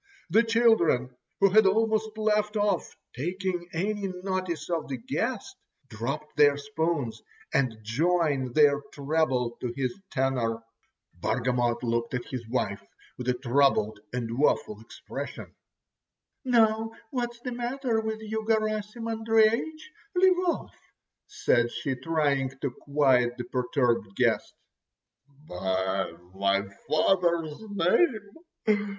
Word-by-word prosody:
The 220 +5 +6
children, 225 - +3 0.3
who 195 -1 +6
had 215 0 +6
almost 220 +1 +1
left 210 0 +1
off 205 0 0 0.2
taking 175 +4 -3
any 200 +4 -1
notice 185 -3 -3
of 170 -2 -2
the 135 - -3
guest, 115 - -3 0.3
dropped 135 +7 -5
their 145 -1 +6
spoons 145 -5 -2 0.3
and 130 -5 +1
joined 140 +1 +1
their 145 -2 +5
treble 140 -5 0
to 125 - -2
his 130 +3 -1
tenor. 125 -5 0 0.6
Bargamot 120 +3 0
looked 115 +1 -1
at 125 - -3
his 120 -4 -6
wife 105 -5 -1 0.3
with 125 0 -4
a 125 - +2
troubled 120 -4 +2
and 120 0 -3
woeful 110 -7 +1
expression. 115 - -8 0.9
"Now, 225 -3 +3 0.2
what's 240 -2 -3
the 250 - -4
matter 245 -1 -1
with 220 0 -4
you, 220 0 -3
Garasim 215 0 0
Andreich. 225 +7 +2 0.3
Leave 365 0 +5
off," 340 - -2 0.5
said 125 - +2
she, 140 - -2
trying 140 -1 0
to 140 - -1
quiet 130 -3 +2
the 120 - -3
perturbed 120 -4 0
guest. - - +1 0.9
"By 95 0 -1 0.2
my 100 +1 +1 0.2
father's 170 -2 +2
name! 205 - 0
155 Hz, 115 wpm, -27 LUFS, -, 0.9 s, The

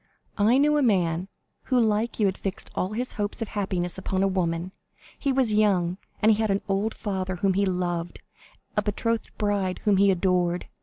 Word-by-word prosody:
I 220 +5 +4
knew 300 +2 +4
a - - +3
man 180 - +1 0.4
who 255 -2 +2
like 220 0 +1
you 210 - +3
had 190 -1 +1
fixed 195 -2 -5
all 185 +3 -2
his 245 +3 -2
hopes 205 +1 -3
of 225 - -3
happiness 190 -3 -2
upon 190 0 -1
a - - +4
woman. 175 -2 -1 0.5
He 280 - 0
was 260 -5 +2
young, 190 -4 +2 0.2
he 220 +1 +6
had 220 0 0
an 195 0 0
old 200 +2 0
father 190 -2 -3
whom 190 +2 +1
he 200 +1 +1
loved, 175 -2 -2 0.6
a 210 - +3
betrothed 225 +2 -1
bride 200 -3 0
whom 205 -2 +3
he 200 +1 +5
adored. 180 -1 +1
195 Hz, 190 wpm, -26 LUFS, 185-215 Hz, 0.6 s, he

